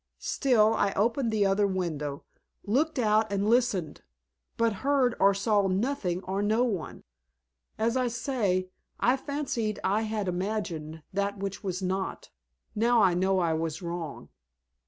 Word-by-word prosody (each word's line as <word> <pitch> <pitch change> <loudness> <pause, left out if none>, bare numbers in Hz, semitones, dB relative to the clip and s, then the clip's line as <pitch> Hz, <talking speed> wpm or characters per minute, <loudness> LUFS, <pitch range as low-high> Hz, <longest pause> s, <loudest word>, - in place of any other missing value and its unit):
Still, 225 -6 +2
I 200 -3 +1
opened 230 +4 +1
the 210 -2 +2
other 200 +1 +3
window, 155 -7 -3 0.4
looked 285 +9 +1
out 215 -2 +2
and 200 +1 0
listened, 215 -10 +1 0.6
but 230 -1 +2
heard 270 -3 +2
or 195 0 +5
saw 200 0 +2
nothing 190 -3 -1
or 195 +2 -2
no 215 +4 +2
one. 200 -10 -3 0.7
As 230 +2 +1
I 255 -1 +1
say, 220 -7 -1 0.3
I 245 +2 +3
fancied 265 -6 -3
I 205 +3 +2
had 215 -2 -2
imagined 175 -5 -3
that 200 +1 -1
which 195 +1 -5
was 185 -1 -3
not. 190 +1 -3 0.4
Now 235 +2 +3
I 185 -2 +4
know 190 +2 +2
I 170 -3 +2
was 160 +1 -3
wrong." 170 -3 -5
200 Hz, 145 wpm, -28 LUFS, 185-230 Hz, 0.7 s, or